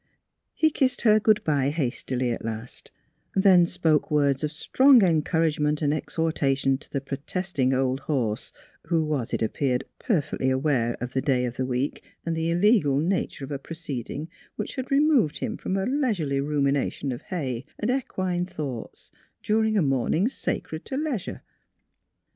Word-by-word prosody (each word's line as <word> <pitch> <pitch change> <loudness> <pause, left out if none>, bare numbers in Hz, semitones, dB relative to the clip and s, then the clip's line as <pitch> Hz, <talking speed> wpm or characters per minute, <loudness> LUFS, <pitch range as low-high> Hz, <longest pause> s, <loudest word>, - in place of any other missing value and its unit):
He 315 -1 +3
kissed 260 -3 +1
her 215 -2 +6
good 215 0 +3
bye 140 -3 +1
hastily 130 -4 -1
at 115 - -4
last; 115 +2 -5 0.5
then 190 -3 +6
spoke 165 -4 +1
words 140 -2 +2
of 150 - -1
strong 255 - +5
encouragement 155 -3 +1
and 145 0 +2
ex 155 - -5
hortation 135 -4 +1
to - - -17
the 140 - -1
protesting 140 +1 -2
old 130 0 +1
horse, 125 -7 -1 0.4
who 165 -2 +1
was, 145 -6 -2
it - - 0
appeared, 125 +3 0 0.2
perfectly 145 - 0
aware 130 -3 +1
of 125 +1 -5
the 130 - +1
day 130 -3 +1
of 120 0 -4
the 130 0 -2
week 130 +2 -2 0.2
and 165 -1 -1
the 160 0 -1
illegal 175 - +3
nature 165 -4 -1
of 140 - -11
a 140 - -3
proceeding 150 -2 -5 0.3
which - - -5
removed 275 - +3
him - - -3
from 190 - -3
a 190 - 0
leisurely 215 - 0
rumination 140 -1 0
of 120 - -5
hay 135 -9 -4
and 215 +4 0
equine 185 -9 -1
thoughts 140 -10 -6 0.3
during 220 0 +2
a 190 - +3
morning 135 - +1
sacred 160 -10 -3
to 265 - -4
leisure. 285 - -3
150 Hz, 160 wpm, -25 LUFS, 135-185 Hz, 0.5 s, her